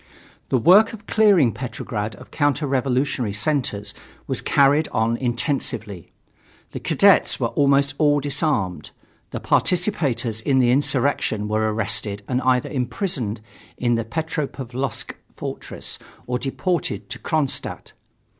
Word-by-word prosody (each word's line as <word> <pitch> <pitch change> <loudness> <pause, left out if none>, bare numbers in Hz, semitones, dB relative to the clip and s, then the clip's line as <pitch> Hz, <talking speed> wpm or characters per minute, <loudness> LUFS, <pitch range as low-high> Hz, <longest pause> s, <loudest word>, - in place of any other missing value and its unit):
The 130 - +3
work 190 - +6
of 215 -1 -10
clearing 200 - +4
Petrograd 115 -3 -5
of 125 - -15
counter 145 0 +1
revolutionary 130 -4 0
centers 105 -2 -1 0.3
was - - -1
carried 145 +2 +3
on 110 +1 0
intensively. 120 - -2 0.6
The - - -5
cadets - - +4
were - - 0
almost 140 -1 +2
all 145 -2 +4
disarmed, 140 - -1 0.4
the - - -5
participators 135 - +1
in 135 +3 +1
the 125 -2 +4
insurrection 130 -5 +1
were 110 0 0
arrested 105 -1 -1
and 125 0 0
either 125 -1 +1
imprisoned 125 - -2 0.4
in 120 -1 +1
the 115 0 0
Petropavlovsk 135 -2 -4 0.2
fortress - - -5 0.3
or 125 0 -2
deported 170 +6 -2
to - - -4
Kronstadt. 155 -5 -2
130 Hz, 120 wpm, -22 LUFS, 115-145 Hz, 0.6 s, work